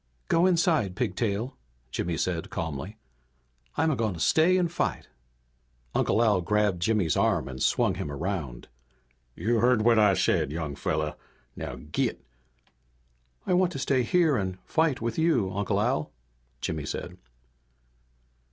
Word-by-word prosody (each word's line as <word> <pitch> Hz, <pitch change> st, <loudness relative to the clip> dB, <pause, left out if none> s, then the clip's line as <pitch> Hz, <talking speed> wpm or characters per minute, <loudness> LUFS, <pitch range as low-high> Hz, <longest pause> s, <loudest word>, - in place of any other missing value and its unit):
"Go 170 Hz, +2 st, +4 dB
inside, 165 Hz, -, +2 dB
Pigtail," 115 Hz, 0 st, -2 dB, 0.4 s
Jimmy 85 Hz, +3 st, -2 dB
said, 85 Hz, -1 st, -2 dB
calmly. 80 Hz, +4 st, -5 dB, 0.8 s
"I'm 160 Hz, +1 st, +2 dB
a -, -, +1 dB
going 110 Hz, -6 st, -1 dB
to -, -, -8 dB
stay 165 Hz, -, +4 dB
and 175 Hz, -2 st, +1 dB
fight!" -, -, -2 dB, 0.8 s
Uncle 115 Hz, -, +2 dB
Al 105 Hz, -5 st, +3 dB
grabbed 105 Hz, -1 st, +1 dB
Jimmy's 95 Hz, -5 st, +1 dB
arm -, -, +1 dB
and 65 Hz, -1 st, -7 dB
swung -, -, +2 dB
him 75 Hz, -, -5 dB
around. 75 Hz, -5 st, -4 dB, 0.7 s
"You 115 Hz, +2 st, 0 dB
heard 120 Hz, -2 st, +3 dB
what 115 Hz, -1 st, +5 dB
I 105 Hz, -3 st, +5 dB
said, 70 Hz, -, +1 dB
young 80 Hz, -2 st, -3 dB
fella. 75 Hz, +2 st, -2 dB, 0.4 s
Now 65 Hz, -, -5 dB
git!" 75 Hz, +5 st, -3 dB, 1.2 s
"I -, -, +1 dB
want 180 Hz, 0 st, +3 dB
to -, -, -4 dB
stay 135 Hz, -1 st, +1 dB
here 155 Hz, +3 st, +3 dB
and 95 Hz, -2 st, -2 dB
fight 160 Hz, -6 st, +1 dB
with 115 Hz, +5 st, -2 dB
you, 160 Hz, -, +2 dB
Uncle 100 Hz, 0 st, 0 dB
Al," 105 Hz, -8 st, 0 dB, 0.5 s
Jimmy 75 Hz, -4 st, -3 dB
said. -, -, -5 dB
105 Hz, 145 wpm, -27 LUFS, 85-135 Hz, 1.2 s, what